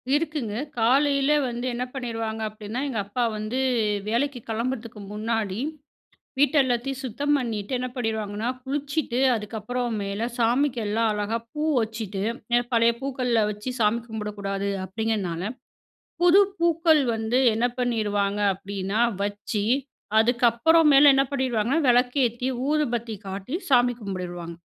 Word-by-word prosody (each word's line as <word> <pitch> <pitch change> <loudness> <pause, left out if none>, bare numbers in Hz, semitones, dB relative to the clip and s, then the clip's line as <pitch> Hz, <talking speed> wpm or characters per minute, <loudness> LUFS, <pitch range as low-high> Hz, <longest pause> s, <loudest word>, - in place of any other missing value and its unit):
இருக்குங்க. 295 -9 -2 0.2
காலைல 275 +4 +3 0.2
வந்து 240 +1 -4
என்ன 245 +1 -2
பண்ணிருவாங்க 225 -4 -4
அப்டின்னா, 215 +3 -6
எங்க 230 -6 -2
அப்பா 240 +4 -2
வந்து 215 +5 -3 0.5
வேலைக்கு 250 +3 0
கிளம்புறதுக்கு 230 -1 -3
முன்னாடி, 215 -2 -2 0.8
வீட்டெல்லாத்தையும் 270 -3 +2
சுத்தம் 285 +5 0
பண்ணிட்டு 220 -3 -4
என்ன 255 0 -3
பண்ணிருவாங்கனா, 220 -1 -2 0.2
குளிச்சிட்டு 280 -2 -2 0.2
அதுக்கப்புறமேல 220 -1 -3
சாமிக்கெல்லாம் 230 -3 +1
அழகா 210 +2 -1 0.2
பூ 300 - -3 0.2
வச்சிட்டு, 220 -3 -4 0.3
எ - - +4
பழைய 230 0 +4
பூக்கள்ல 255 -4 0
வச்சு 210 +5 -5
சாமி 215 +2 +3
கும்பிடக்கூடாது 200 -2 -3 0.2
அப்டிங்கனால, 190 -4 -2 0.8
புது 355 +3 +7 0.2
பூக்கள் 330 -3 +4
வந்து 225 +3 0 0.2
என்ன 230 +2 +2
பண்ணிருவாங்க 210 -4 0
அப்டினா 195 +2 -4 0.2
வச்சு 205 +1 -2 0.5
அதுக்கப்புறமேல 275 +6 +5
என்ன 270 0 +4
பண்ணிருவாங்கனா, 255 0 0
வெளக்கேத்தி, 245 0 +2 0.2
ஊதுபத்தி 240 -7 0
காட்டி, 195 +7 -5
சாமி 245 -2 +4
கும்ப்டிருவாங்க. 175 -4 -5
230 Hz, 110 wpm, -25 LUFS, 210-260 Hz, 0.8 s, புது